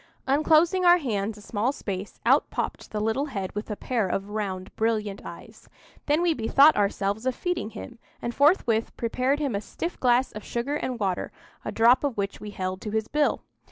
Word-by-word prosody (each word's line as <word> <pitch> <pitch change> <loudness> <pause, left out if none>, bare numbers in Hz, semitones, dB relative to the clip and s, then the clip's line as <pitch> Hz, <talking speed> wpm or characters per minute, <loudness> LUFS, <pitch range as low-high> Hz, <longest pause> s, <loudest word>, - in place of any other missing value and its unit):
Unclosing 315 +6 +3
our 350 0 +7
hands 215 - -2
a - - -12
small 225 +4 0
space, 200 -7 -6
out - - +4
popped - - -4
the 215 - -3
little 225 +6 0
head 195 -9 -4
with 210 +2 -5
a 210 - -2
pair 230 -2 -1
of 195 +2 -3
round 190 -3 -4
brilliant 215 -3 -1
eyes. - - -11 0.4
Then 300 +4 +2
we 345 -2 +3
bethought 275 +4 +5
ourselves 205 +3 0
of 255 - 0
feeding 355 -11 -2
him, 235 +1 -10 0.2
and 235 - -4
forthwith 255 - +2
prepared 255 +4 0
him 285 -5 -1
a 200 - -1
stiff 335 - -5
glass 250 +1 +3
of 215 - -8
sugar 240 +4 -3
and 255 -4 -3
water, 190 -3 -1 0.3
a - - -4
drop 235 +4 +4
of 280 -6 -1
which 200 0 -2
we 210 - -6
held 185 -2 -4
to 215 - -5
his 220 +1 -1
bill. 295 0 +1
230 Hz, 195 wpm, -26 LUFS, 205-280 Hz, 0.4 s, our